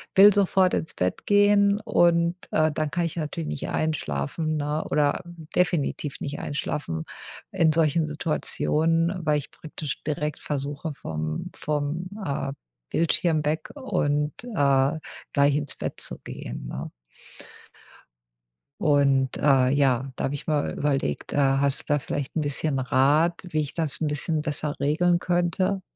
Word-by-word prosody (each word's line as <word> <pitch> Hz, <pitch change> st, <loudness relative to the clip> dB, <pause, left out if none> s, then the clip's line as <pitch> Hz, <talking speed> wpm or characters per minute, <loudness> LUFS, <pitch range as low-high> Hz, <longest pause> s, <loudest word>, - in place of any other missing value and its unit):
will 200 Hz, +2 st, +9 dB
sofort 190 Hz, -2 st, +3 dB
ins 160 Hz, -, -1 dB
Bett 90 Hz, 0 st, -2 dB
gehen. 205 Hz, 0 st, +4 dB
Und, 170 Hz, -5 st, +3 dB, 0.2 s
äh, 155 Hz, 0 st, +3 dB
dann 155 Hz, 0 st, -2 dB
kann 175 Hz, 0 st, 0 dB
ich 165 Hz, +1 st, -4 dB
natürlich 145 Hz, -, -3 dB
nicht 75 Hz, -, -4 dB
einschlafen, 155 Hz, -, -1 dB
ne, 150 Hz, +1 st, -1 dB
oder 145 Hz, -1 st, +1 dB, 0.3 s
definitiv 155 Hz, -5 st, 0 dB
nicht 145 Hz, +1 st, -4 dB
einschlafen 130 Hz, -, -3 dB, 0.5 s
in 160 Hz, -2 st, +3 dB
solchen 160 Hz, 0 st, +2 dB
Situationen, 165 Hz, +2 st, 0 dB
weil 150 Hz, -1 st, +3 dB
ich 145 Hz, -, -10 dB
praktisch 155 Hz, -2 st, -6 dB
direkt 150 Hz, 0 st, -2 dB
versuche, 145 Hz, +2 st, -4 dB
vom 75 Hz, -, -4 dB
vom, 150 Hz, +4 st, -2 dB, 0.2 s
äh, 140 Hz, -1 st, -2 dB, 0.4 s
Bildschirm 165 Hz, -1 st, +2 dB
weg 155 Hz, +2 st, -1 dB
und, 150 Hz, -, 0 dB
äh, 140 Hz, -, +2 dB, 0.3 s
gleich 140 Hz, 0 st, +4 dB
ins 145 Hz, -2 st, -3 dB
Bett -, -, -5 dB
zu -, -, -5 dB
gehen, -, -, -7 dB
ne? -, -, -5 dB, 1.9 s
Und, 140 Hz, -4 st, +3 dB
äh, 135 Hz, -3 st, +4 dB
ja, 135 Hz, -1 st, +2 dB
da -, -, -4 dB
habe 135 Hz, -, -2 dB
ich 145 Hz, -, -6 dB
mal 150 Hz, -2 st, 0 dB
überlegt. 140 Hz, -2 st, -1 dB
Äh, -, -, -1 dB
hast 140 Hz, 0 st, +2 dB
du -, -, -23 dB
da 145 Hz, 0 st, +2 dB
vielleicht 140 Hz, 0 st, -4 dB
'n 160 Hz, -, +1 dB
bisschen 145 Hz, -1 st, -1 dB
Rat, 150 Hz, +8 st, +2 dB
wie 155 Hz, -2 st, 0 dB
ich 145 Hz, -, -5 dB
das 160 Hz, -2 st, -3 dB
'n 155 Hz, -, +1 dB
bisschen 150 Hz, +2 st, -1 dB
besser 150 Hz, -1 st, -3 dB
regeln 170 Hz, +4 st, +2 dB
könnte? 180 Hz, +2 st, +1 dB
150 Hz, 145 wpm, -25 LUFS, 140-165 Hz, 1.9 s, will